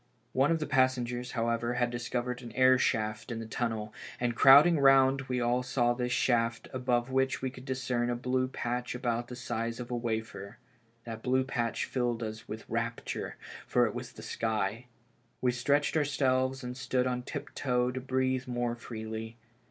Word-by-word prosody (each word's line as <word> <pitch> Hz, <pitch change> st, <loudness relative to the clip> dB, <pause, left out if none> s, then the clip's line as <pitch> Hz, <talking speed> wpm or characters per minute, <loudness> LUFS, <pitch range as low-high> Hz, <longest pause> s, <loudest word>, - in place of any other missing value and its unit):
One 135 Hz, +3 st, +3 dB
of 165 Hz, -, +3 dB
the 155 Hz, -, -3 dB
passengers, 125 Hz, -3 st, +1 dB
however, 115 Hz, +1 st, 0 dB
had 120 Hz, -1 st, +1 dB
discovered 120 Hz, +1 st, -3 dB
an 120 Hz, -2 st, -9 dB
air 130 Hz, 0 st, +5 dB
shaft 110 Hz, +1 st, 0 dB
in 115 Hz, -, -3 dB
the 115 Hz, -, -5 dB
tunnel, 110 Hz, -2 st, -3 dB, 0.3 s
and 120 Hz, -1 st, 0 dB
crowding 145 Hz, +6 st, +8 dB
round 135 Hz, 0 st, +5 dB
we 125 Hz, -1 st, 0 dB
all 120 Hz, +1 st, +1 dB
saw 125 Hz, -1 st, +1 dB
this 125 Hz, 0 st, -2 dB
shaft, 115 Hz, -2 st, +1 dB
above 125 Hz, -1 st, 0 dB
which 130 Hz, 0 st, +1 dB
we 130 Hz, -, -1 dB
could 130 Hz, 0 st, -12 dB
discern 125 Hz, -2 st, -1 dB
a 120 Hz, -, 0 dB
blue 130 Hz, +1 st, 0 dB
patch 125 Hz, -1 st, -3 dB
about 120 Hz, -1 st, -1 dB
the 125 Hz, -, -7 dB
size 115 Hz, -1 st, -3 dB
of 120 Hz, 0 st, -6 dB
a -, -, 0 dB
wafer. 110 Hz, -3 st, -4 dB, 0.5 s
That 115 Hz, -1 st, -7 dB
blue 130 Hz, +2 st, +2 dB
patch 120 Hz, -3 st, -1 dB
filled 120 Hz, -2 st, -1 dB
us 110 Hz, 0 st, -6 dB
with 110 Hz, +1 st, -7 dB
rapture, 115 Hz, +1 st, -3 dB, 0.3 s
for -, -, +3 dB
it -, -, -2 dB
was -, -, -6 dB
the -, -, -11 dB
sky. 110 Hz, +1 st, -2 dB, 0.5 s
We 125 Hz, -, +2 dB
stretched 140 Hz, +5 st, +1 dB
ourselves 135 Hz, -3 st, +1 dB
and 125 Hz, 0 st, -5 dB
stood 125 Hz, 0 st, 0 dB
on 125 Hz, -1 st, -1 dB
tiptoe 125 Hz, 0 st, -1 dB
to 130 Hz, +1 st, -4 dB
breathe 130 Hz, 0 st, 0 dB
more 120 Hz, -1 st, -1 dB
freely. 110 Hz, -1 st, -6 dB
125 Hz, 175 wpm, -30 LUFS, 115-130 Hz, 0.5 s, crowding